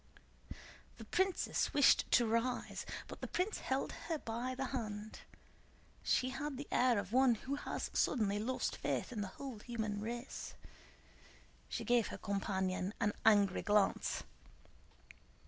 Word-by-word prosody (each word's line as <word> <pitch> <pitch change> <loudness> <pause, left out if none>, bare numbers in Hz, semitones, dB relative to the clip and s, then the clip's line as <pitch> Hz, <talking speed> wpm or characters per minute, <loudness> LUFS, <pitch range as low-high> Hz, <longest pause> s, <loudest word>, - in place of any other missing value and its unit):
The 225 - -9
princess 375 - +1
wished 285 -1 +6
to 240 - +6
rise, 230 +3 -1 0.2
but - - -9
the - - -3
prince 370 +4 -1
held 265 +1 -1 0.2
her 325 - +1
by 245 0 -3
the 270 0 -2
hand. 215 -3 -4 0.8
She 255 - +2
had 290 0 -4
the 285 - -6
air 245 -2 +4
of 200 +1 -3
one 260 -2 +5
who 260 +5 -5
has 285 - -3
suddenly 205 -5 +2
lost 255 +4 -1
faith - - -1
in 225 -4 -3
the 200 - -2
whole 265 -6 -6
human 215 -3 -3
race. 235 +4 -5 1.1
She - - -3
gave 240 -2 +3
her - - -6
companion 190 -1 -1
an 210 -2 +2
angry 205 -3 +5
glance. 205 -1 +2
235 Hz, 140 wpm, -36 LUFS, 210-260 Hz, 1.1 s, wished